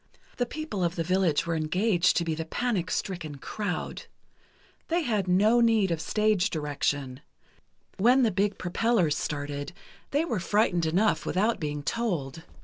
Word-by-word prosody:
The 245 - 0
people 305 - -4
of 170 0 0
the 165 - -1
village 180 -3 +1
were 170 - -1
engaged 175 +4 +2
to 170 - +2
be 165 - -1
the 160 +1 -3
panic 195 -2 -1
stricken 175 -8 -3
crowd. 190 +6 -4 0.8
They 340 +1 +1
had 215 -8 0
no 210 +6 +4
need 225 -5 +3
of 165 -1 -1
stage 215 +1 +1
direction. 145 -4 -2 0.8
When 250 +6 +4
the 225 - +3
big 200 +2 0
propellers 180 -3 +1
started, 145 +2 -4 0.4
they 295 +3 +1
were 230 - -1
frightened 180 -3 +1
enough 190 +7 +2
without 215 +5 0
being 150 -2 -3
told. 165 - -2
185 Hz, 150 wpm, -27 LUFS, 160-220 Hz, 0.8 s, no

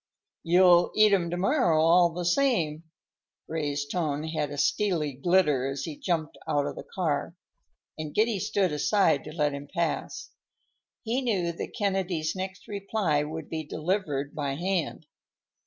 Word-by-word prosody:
"You'll 175 0 +5
eat 215 -1 +5
'em 175 -4 +2
to 175 - -3
morrow, 185 - +2
all 170 +2 +5
the 175 +1 -5
same." 170 - +1 0.6
Ray's 145 -3 -2
tone 150 -1 -2
had 160 -2 -2
a 145 - -7
steely 165 -4 +1
glitter 150 -2 +2
as 135 0 -4
he 160 -3 -5
jumped 160 -1 -2
out 145 -1 +1
of - - -4
the - - -9
car, 165 -2 -1 0.6
and 155 -1 -4
Giddy 215 +1 +1
stood 200 -2 0
aside 155 0 +2
to 155 - -7
let 150 -2 0
him 140 0 -7
pass. 170 0 -3 0.7
He 240 +4 -1
knew 195 -9 0
that 170 - -7
Kennedy's 190 -6 -1
next 190 0 -6
reply 200 -6 0
would 155 +1 -5
be 160 -1 -4
delivered 150 -3 -2
by 140 -2 -2
hand. 175 -1 -2
170 Hz, 155 wpm, -27 LUFS, 150-190 Hz, 0.7 s, You'll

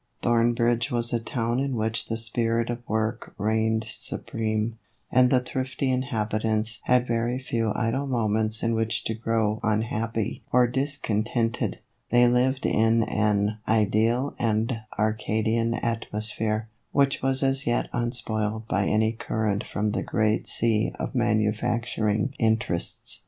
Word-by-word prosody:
Thornbridge 120 +1 +2
was 120 -2 0
a 120 - +2
town 115 +1 -1
in 135 -1 -1
which 110 0 -1
the 115 - -2
spirit 115 +1 0
of 120 - -4
work 110 +2 -2
reigned 110 +2 +1
supreme, 110 0 -2 0.3
and 125 0 +5
the 130 - +4
thrifty 130 +1 -2
inhabitants 110 -3 -1
had 125 0 +3
very 120 +1 0
few 115 -4 -1
idle 125 +4 0
moments 110 -3 0
in 115 0 +1
which 115 0 0
to 110 - -1
grow 110 -1 0
un 110 0 +1
happy 115 0 -2
or 125 0 +5
discontented; 120 -3 -1 0.3
they 120 +1 +5
lived 130 +2 +2
in 115 +1 +3
an 105 0 +1
ideal 110 +5 +2
and 115 +1 0 0.2
Arcadian 110 +2 0
atmosphere, 110 -1 -2 0.2
which 140 -1 +2
was 135 +1 +1
as 135 -1 +1
yet 120 - +1
unspoiled 110 -2 -1
by 100 -2 +1
any 110 +1 +2
current 110 -2 -1
from 105 0 -2
the 115 - -1
great 110 0 0
sea 110 -1 +1
of - - -4
manufacturing 110 0 0
interests. 110 -6 0
115 Hz, 135 wpm, -26 LUFS, 110-120 Hz, 0.3 s, and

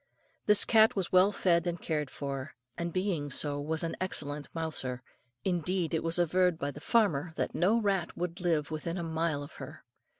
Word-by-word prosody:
This 210 -1 +8
cat 220 -1 +5
was 190 -4 -2
well 185 +2 +5
fed 175 -3 +1
and 175 0 -2
cared 150 -4 -2
for, 140 0 -6 0.2
and 170 0 -3
being 185 -5 -1
so, 145 +1 -1
was 160 +2 -1
an 165 - -2
excellent 145 -6 -1
mouser. 135 -6 -3 0.4
Indeed, 180 -1 -1
it 160 - 0
was 165 +1 +1
averred 180 0 +2
by 145 -2 -3
the 150 - -11
farmer 175 -9 +1
that - - -2
no 200 +7 +2
rat 195 -5 -1
would 175 +1 -4
live 160 -4 0
within 165 +3 -4
a 175 - -3
mile 160 -2 -1
of 145 - -11
her. - - -9
165 Hz, 190 wpm, -30 LUFS, 150-185 Hz, 0.4 s, This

